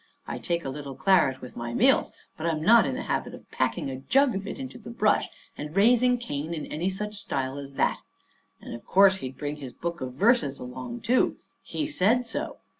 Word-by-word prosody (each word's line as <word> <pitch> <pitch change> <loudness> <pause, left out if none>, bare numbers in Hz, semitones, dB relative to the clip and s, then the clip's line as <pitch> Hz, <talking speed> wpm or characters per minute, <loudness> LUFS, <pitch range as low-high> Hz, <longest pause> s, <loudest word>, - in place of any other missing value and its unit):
I - - -5
take 170 -1 -2
a - - -2
little 140 0 -6
claret 165 -9 +3
with 125 - -10
my 120 0 -4
meals, 265 +2 +4 0.2
but 160 - -3
I'm 155 -2 -1
not 230 +5 +6
in 130 - -2
the - - -4
habit - - -2
of - - -17
packing - - -1
a 130 -1 -5
jug 270 - +3
of 195 +1 -4
it - - -5
into 260 -2 -7
the 225 - -10
brush 215 -2 +2 0.3
and 150 +2 -7
raising 245 +4 +5
Cain 155 -7 -4
in 155 - -5
any 170 +5 -2
such 210 +2 -4
style 135 +1 -3
as 140 0 -9
that. - - +1 0.6
And - - -9
of 115 - -8
course 195 0 +5
he'd 130 -7 -7
bring 145 0 -4
his 135 -4 -8
book 170 0 -5
of 130 -1 -4
verses 190 - +3
along, 125 -1 -7
too. 250 +4 +2 0.2
He 305 - -3
said 250 -3 +2
so. 230 - -4
170 Hz, 215 wpm, -27 LUFS, 135-225 Hz, 0.6 s, not